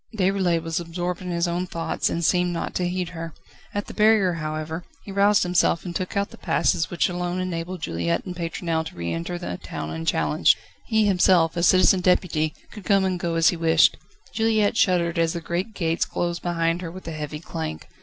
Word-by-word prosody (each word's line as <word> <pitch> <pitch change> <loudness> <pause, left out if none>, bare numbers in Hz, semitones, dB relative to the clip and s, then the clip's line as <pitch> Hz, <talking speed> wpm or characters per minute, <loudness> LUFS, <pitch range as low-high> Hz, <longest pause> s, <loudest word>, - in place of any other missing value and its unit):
Déroulède 185 -4 +1
was 165 0 -2
absorbed 175 +1 -4
in 180 - -5
his 170 0 0 0.2
thoughts, 165 -1 -1
and 170 0 -1
seemed 180 +1 +2
not 170 - -3
to 180 - 0
heed 180 -1 -2
her. 165 -2 -7 0.4
At 205 0 -3
the - - -9
barrier, 210 -4 +4
however, 155 +1 -4 0.2
he 200 - -8
roused 200 +1 +4
himself 180 -1 +2
and 175 -1 -5
took 185 +2 -3
out 200 0 0
the - - -13
passes 165 -1 +1
which 175 - +1
alone 180 0 -2
enabled 180 -1 -4
Juliette 85 0 -1
and 180 -2 -6
Pétronelle 165 -1 -2
to - - -11
re 85 -1 -3
enter 85 - -3
the 130 - -5
town 80 0 -5
unchallenged. 80 -1 +2 0.3
He 220 -1 +3
himself 180 -4 +4
as 170 0 +3
Citizen 185 0 +5
Deputy 170 -4 +1 0.2
could 210 - -10
come 195 -1 +3
and 185 -1 -1
go 170 -1 -2
as 165 0 +5
he - - -1
wished. 165 -1 +4 0.4
Juliette 220 -1 +2
shuddered 175 -5 +2
as 165 -1 +2
the 170 - -3
great 180 +6 -3
gates 165 -2 0
closed 175 0 -2
behind 170 0 0
her 175 - -5
with 185 +1 -10
a - - -3
heavy 150 -1 -5
clank. 80 - -6
175 Hz, 205 wpm, -24 LUFS, 165-185 Hz, 0.4 s, Citizen